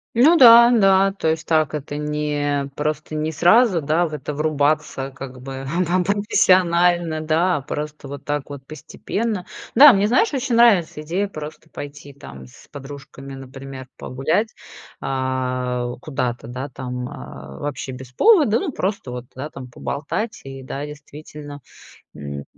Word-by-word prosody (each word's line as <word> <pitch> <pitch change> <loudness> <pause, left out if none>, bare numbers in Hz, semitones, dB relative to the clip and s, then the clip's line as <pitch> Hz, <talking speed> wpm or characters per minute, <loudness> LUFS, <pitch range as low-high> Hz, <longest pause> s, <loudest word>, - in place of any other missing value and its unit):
Ну 285 +9 +6
да, 235 -3 +9
да. 195 -4 +4
То 195 -4 -3
есть, 160 0 -1
так 155 -2 +2
это, 145 0 -5
не 150 -1 -1
просто, 150 +1 -3
не 155 +1 -1
сразу, 175 - +4
да, 155 +4 +1
в 155 - -9
это 150 0 -5
врубаться, 145 -2 0
как 130 -1 -9
бы, 135 0 -7 0.2
там-там 180 +2 +1
профессионально, 175 -4 +2
да, 165 +3 +1
а - - -5
просто 150 +1 -6
вот 140 0 -8
так 145 -1 -3
вот 140 -2 -9
постепенно. 190 +7 -4 0.3
Да, 280 +2 +10
мне, 200 0 +2
знаешь, 260 - +2
очень 250 -3 -1
нравится 205 -10 +4
идея 175 +7 -1
просто 155 -3 -9
пойти, 145 -1 -9
там, 65 - -12
с 60 - -18
подружками, 140 -1 -10
например, 135 0 -9
погулять, 155 - -1 0.5
а, 130 -2 -2
куда-то, 125 -6 -3
да, 130 +4 -6
там, 125 -1 -5
а, 70 0 -10
вообще 145 -2 -4
без 130 0 -10
повода, 295 - +4
ну, 370 -6 -3
просто 190 - -3
вот, 125 0 -6
да, 140 +4 -5
там, 130 -4 -10
поболтать. 145 - -4
И 135 0 -8
да, 140 +2 -5
действительно, 150 0 -10 0.5
м, 70 -1 -7
150 Hz, 150 wpm, -21 LUFS, 135-180 Hz, 0.5 s, Да